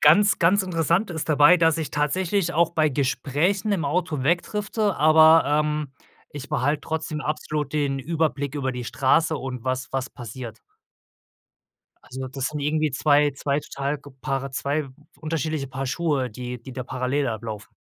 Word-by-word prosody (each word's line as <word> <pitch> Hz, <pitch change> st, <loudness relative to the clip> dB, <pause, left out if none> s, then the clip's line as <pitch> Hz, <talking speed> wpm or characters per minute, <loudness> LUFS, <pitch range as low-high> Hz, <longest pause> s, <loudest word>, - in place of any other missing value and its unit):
ganz, 200 Hz, +8 st, +5 dB
ganz 190 Hz, +4 st, +4 dB
interessant 175 Hz, +2 st, 0 dB
ist 160 Hz, -1 st, -4 dB
dabei, 150 Hz, +4 st, +6 dB
dass 165 Hz, -1 st, +3 dB
ich 155 Hz, -, -3 dB
tatsächlich 175 Hz, +4 st, 0 dB
auch 170 Hz, 0 st, +3 dB
bei 155 Hz, -2 st, +2 dB
Gesprächen 145 Hz, -, 0 dB
im 165 Hz, -7 st, 0 dB
Auto 150 Hz, -2 st, -1 dB
wegdrifte, 205 Hz, -, 0 dB
aber, 155 Hz, +2 st, +6 dB
ähm, 150 Hz, -1 st, 0 dB, 0.4 s
ich 145 Hz, -1 st, -7 dB
behalte 145 Hz, +4 st, 0 dB
trotzdem 160 Hz, -1 st, -4 dB
absolut 150 Hz, -1 st, -3 dB
den 140 Hz, -2 st, 0 dB
Überblick 150 Hz, -1 st, -1 dB
über 130 Hz, -2 st, -2 dB
die 125 Hz, -1 st, -5 dB
Straße 155 Hz, +7 st, +2 dB
und 130 Hz, -3 st, -6 dB
was 130 Hz, +1 st, -2 dB
was 135 Hz, -1 st, -2 dB
passiert. 115 Hz, -1 st, -8 dB, 1.5 s
Also, 130 Hz, +1 st, -7 dB
das 135 Hz, 0 st, -4 dB
sind 150 Hz, -1 st, -5 dB
irgendwie 155 Hz, 0 st, 0 dB
2 145 Hz, +1 st, +3 dB
2 140 Hz, +1 st, -1 dB
total 140 Hz, +1 st, -3 dB
ge 145 Hz, -, -14 dB
paare 135 Hz, +1 st, -2 dB
2 140 Hz, +2 st, -1 dB, 0.3 s
unterschiedliche 155 Hz, -3 st, -2 dB
Paar 135 Hz, +1 st, -4 dB
Schuhe, 140 Hz, -3 st, 0 dB
die 125 Hz, +1 st, -7 dB
die 130 Hz, +1 st, -10 dB
da 130 Hz, -1 st, -5 dB
parallel 130 Hz, +2 st, -1 dB
ablaufen. 110 Hz, -2 st, -6 dB
145 Hz, 160 wpm, -24 LUFS, 135-160 Hz, 1.5 s, dabei